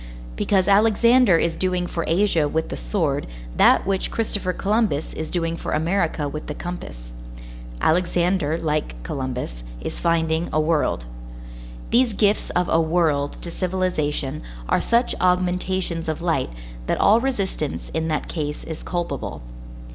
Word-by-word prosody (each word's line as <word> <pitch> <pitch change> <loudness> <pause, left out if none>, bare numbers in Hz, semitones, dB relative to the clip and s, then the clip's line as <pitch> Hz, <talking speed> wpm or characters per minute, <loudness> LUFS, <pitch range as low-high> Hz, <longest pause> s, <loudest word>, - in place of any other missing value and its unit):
Because 190 - +2
Alexander 225 0 +5
is 165 0 +1
doing 180 -1 0
for 170 -1 -3
Asia 170 -3 +2
with 160 +2 -1
the - - -4
sword - - -1 0.3
that - - +5
which 195 -1 0
Christopher 205 -4 -1
Columbus 200 -6 0
is 160 - -5
doing 165 -2 -1
for - - -4
America 160 -1 0
with 150 +2 -6
the 150 - -4
compass; - - -7 0.7
Alexander 175 - +2
like 155 - -1
Columbus, 125 - -4 0.2
is - - -5
finding 165 0 +1
a 155 - +2
world. 155 - +1 0.9
These 240 -1 +4
gifts 205 0 +2
of 180 0 0
a 165 - +3
world 160 -4 +1
to 170 - -5
civilization 160 -6 -1 0.3
are - - +2
such 235 +1 +2
augmentations 180 -2 +1
of 155 - -2
light, 165 -6 0 0.4
that - - 0
all 215 +3 +6
resistance 200 - -2
in 160 0 -1
that 155 -2 -1
case 150 -3 -4
is 160 -1 -6
culpable. 175 - -4
170 Hz, 140 wpm, -23 LUFS, 155-190 Hz, 0.9 s, all